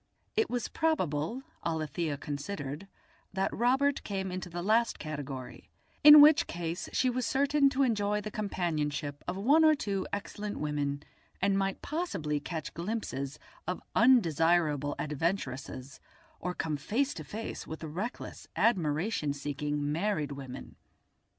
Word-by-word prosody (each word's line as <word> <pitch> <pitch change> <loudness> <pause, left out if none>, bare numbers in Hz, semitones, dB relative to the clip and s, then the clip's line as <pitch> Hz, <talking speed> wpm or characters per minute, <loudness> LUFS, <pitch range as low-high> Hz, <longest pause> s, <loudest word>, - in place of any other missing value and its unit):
It 440 -1 +2
was 245 -2 -1
probable, 235 - 0 0.2
Alethia 160 -1 -2
considered, 145 +3 -5 0.5
that 190 +1 0
Robert 265 +4 +2
came 190 -2 -3
into 180 -1 -5
the 175 0 -5
last 225 +4 +2
category, 145 -4 -6 0.3
in 300 0 +12
which 310 +3 +7
case 170 0 -4
she 260 - +2
was 250 0 0
certain 280 +2 +3
to 275 0 +1
enjoy 210 -4 +1
the 210 +1 -6
companionship 150 -8 -2
of 180 - -2
one 280 +11 +5
or 310 -1 +6
two 200 -8 -2
excellent 205 +1 -4
women, 145 -1 -2 0.4
and 195 0 +2
might 195 -1 -1
possibly 195 - -2
catch 160 0 -5
glimpses 170 -7 -3 0.3
of 180 - -2 0.2
undesirable 165 - +4
adventuresses 145 -4 -3 0.4
or 180 +1 -3
come 155 -2 -2
face 260 - 0
to 155 - -7
face 215 +10 -6
with 160 +1 -7
reckless 180 +10 -5
admiration 160 -5 +1
seeking 145 +1 -2
married 165 -3 0
women. 135 -2 -8
180 Hz, 130 wpm, -30 LUFS, 150-225 Hz, 0.5 s, in